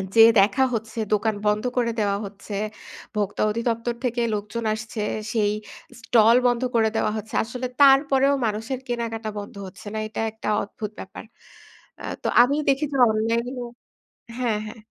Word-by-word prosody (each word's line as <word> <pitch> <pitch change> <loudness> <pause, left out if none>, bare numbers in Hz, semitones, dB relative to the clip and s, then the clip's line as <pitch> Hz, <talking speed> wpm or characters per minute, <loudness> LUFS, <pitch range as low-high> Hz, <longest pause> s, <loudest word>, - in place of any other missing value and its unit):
যে 225 - +8 0.2
দেখা 215 +7 +4
হচ্ছে, 220 0 -5 0.2
দোকান 215 +1 +1
বন্ধ 210 0 +2
করে 235 -1 +2
দেওয়া 200 -1 +1
হচ্ছে। 200 +1 -9 0.6
ভোক্তা 205 -1 -1
অধিদপ্তর 230 +1 -1
থেকে 245 -1 0
লোকজন 210 +3 -4
আসছে, 220 0 -5 0.3
সেই 210 -3 +2 0.5
স্টল 230 0 +5
বন্ধ 245 0 +1
করে 220 -1 +4
দেওয়া 220 - +1
হচ্ছে। 215 +1 -7
আসলে 250 +3 -5 0.2
তারপরেও 275 0 +5
মানুষের 225 +4 -2
কেনাকাটা 230 -2 -3
বন্ধ 205 - -9
হচ্ছে 185 +2 -12
না। - - -3
এটা 215 - -4
একটা 220 - -8 0.2
অদ্ভুত 210 +1 -7
ব্যাপার। 190 - -9 0.8
আ - - -10 0.2
তো - - 0
আমি 255 +4 +3
দেখি 275 +2 +2
যে - - 0
অনলাইনে 230 +3 0
ও - - -5 0.7
হ্যা, 245 -2 +1 0.2
হ্যা। 215 - -8
225 Hz, 155 wpm, -24 LUFS, 210-240 Hz, 0.8 s, যে